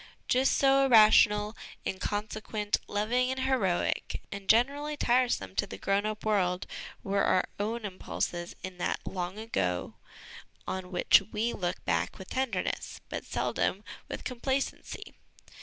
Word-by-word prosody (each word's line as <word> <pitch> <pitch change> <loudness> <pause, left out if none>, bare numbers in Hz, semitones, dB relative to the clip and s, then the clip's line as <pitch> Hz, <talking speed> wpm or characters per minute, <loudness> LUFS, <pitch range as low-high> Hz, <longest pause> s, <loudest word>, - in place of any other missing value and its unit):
Just 260 +2 +3
so 275 0 +5
irrational, 215 -2 +6 0.3
inconsequent, 210 +2 -2
loving 235 +5 +1
and 260 0 -2
heroic, 250 -10 0
and 200 -1 -7
generally 285 +6 +3
tiresome 240 - +1
to - - +1
the 95 - -7
grown 195 - +1
up 215 0 -5
world 185 -4 +1 0.4
were 200 0 +1
our 185 - +3
own 220 +2 -2
impulses 175 -2 -3
in 185 -1 -7
that - - 0
long 180 +1 -4
ago, 95 - -2 0.7
on 185 -1 -4
which 180 - +5
we 225 +3 0
look 180 -2 -3
back 85 +1 0
with 190 - -11
tenderness, 255 -8 -2
but - - -4
seldom - - -1 0.3
with - - -5
complacency. 265 +2 -3
210 Hz, 130 wpm, -30 LUFS, 185-245 Hz, 0.7 s, irrational